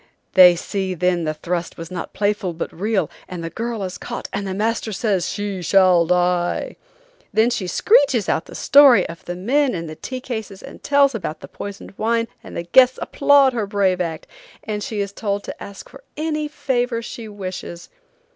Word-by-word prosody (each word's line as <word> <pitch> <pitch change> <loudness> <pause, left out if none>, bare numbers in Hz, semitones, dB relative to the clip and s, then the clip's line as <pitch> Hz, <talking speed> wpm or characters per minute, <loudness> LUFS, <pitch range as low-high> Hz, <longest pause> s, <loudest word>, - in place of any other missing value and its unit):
They 180 -2 +8
see 190 +1 -3
then 180 -1 +1
the 155 - -1
thrust 170 +2 -4
was 165 0 -8
not 180 -2 -5
playful 205 -3 -1
but 165 - -5
real, 205 +3 0 0.2
and 180 -2 -6
the 165 - -5
girl 230 -2 -4
is 185 -1 -5
caught - - -6
and 200 0 -3
the 190 - -3
master 220 +2 -1
says 195 -3 0
she 205 -3 -4
shall 180 -2 +4
die. 180 0 +1 0.6
Then 220 +3 +3
she 200 -6 -2
screeches 275 - +3
out 160 - 0
the - - -12
story 280 -3 +6
of 170 +2 -10
the 175 - -4
men 255 +7 +1
in 170 -1 -4
the 155 - -7
tea 255 - -6
cases 220 -6 -6
and - - -11
tells 280 -1 +3
about 185 -8 -5
the - - -9
poisoned 200 -1 -8
wine, 230 +1 +1 0.2
and - - -9
the 170 - -3
guests 255 +9 +5
applaud 280 -2 +4
her 220 -4 -2
brave 195 -2 +1
act, 165 -2 -4 0.4
and 210 -2 -4
she 215 -3 -3
is 200 0 -4
told 200 -1 -2
to - - -8
ask 200 -1 -10
for - - -15
any 305 -1 -2
favor 245 -5 -1
she 230 -1 -7
wishes. 185 -4 -7
200 Hz, 195 wpm, -21 LUFS, 180-235 Hz, 0.6 s, They